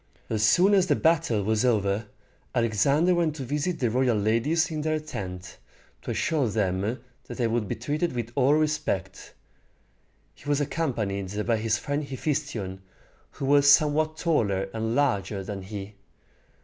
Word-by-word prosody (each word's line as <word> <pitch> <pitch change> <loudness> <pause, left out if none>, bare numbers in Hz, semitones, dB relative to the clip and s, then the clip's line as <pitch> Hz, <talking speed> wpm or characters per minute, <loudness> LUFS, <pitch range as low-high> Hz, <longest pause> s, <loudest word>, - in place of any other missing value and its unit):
As 110 -2 0
soon 180 - +5
as 190 -2 +4
the 145 - +3
battle 160 -10 +2
was 110 +2 +1
over, 105 -3 +1 0.5
Alexander 130 - +2
went 170 -3 +1
to 140 - -5
visit 150 +6 -2
the 120 -4 0
royal 125 -2 +2
ladies 120 - +1
in 155 -1 -3
their 155 0 0
tent, 90 -11 -7 0.4
to - - -8
assure 150 -6 0
them 100 +2 -1 0.3
that 120 - -8
they 120 - 0
would 115 -2 0
be - - -2
treated 150 +8 -2
with 120 -2 -4
all 135 +3 +3
respect. 150 - -2 1.0
He 145 - -10
was 145 -1 +2
accompanied 105 - -2
by 115 -1 +2
his 110 0 0
friend 145 0 -2
Hephæstion, 135 -8 -3 0.5
who 135 - -5
was 140 +1 +5
somewhat 155 +1 +4
taller 100 - 0
and 115 +1 -2
larger 100 -8 0
than 100 0 -6
he. 100 +1 -7
120 Hz, 155 wpm, -26 LUFS, 105-150 Hz, 1.0 s, soon